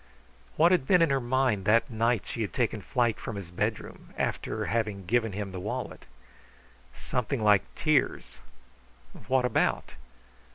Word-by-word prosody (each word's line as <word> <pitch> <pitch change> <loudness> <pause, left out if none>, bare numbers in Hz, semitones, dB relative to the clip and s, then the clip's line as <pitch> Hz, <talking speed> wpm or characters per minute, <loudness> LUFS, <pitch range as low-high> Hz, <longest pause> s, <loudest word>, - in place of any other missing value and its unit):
] 60 0 -29
What 170 +3 +5
had 175 -8 +2
been 180 -2 +5
in 165 - +2
her 135 - +2
mind 120 -5 0
that 115 +5 +3
night 115 -1 +1
she 115 - -5
had 105 - -3
taken 115 -4 -1
flight 120 +2 0
from 115 - -6
his 95 -4 -7
bedroom, 90 - -4
after 110 -1 -2
having 105 0 -2
given 115 +1 +1
him 100 0 -4
the 95 - -6
wallet? - - -5 0.9
Something 125 -1 -2
like 105 -2 +5
tears. 155 -4 0 0.9
What 130 -1 +2
about? 125 - 0
115 Hz, 155 wpm, -28 LUFS, 100-130 Hz, 0.9 s, What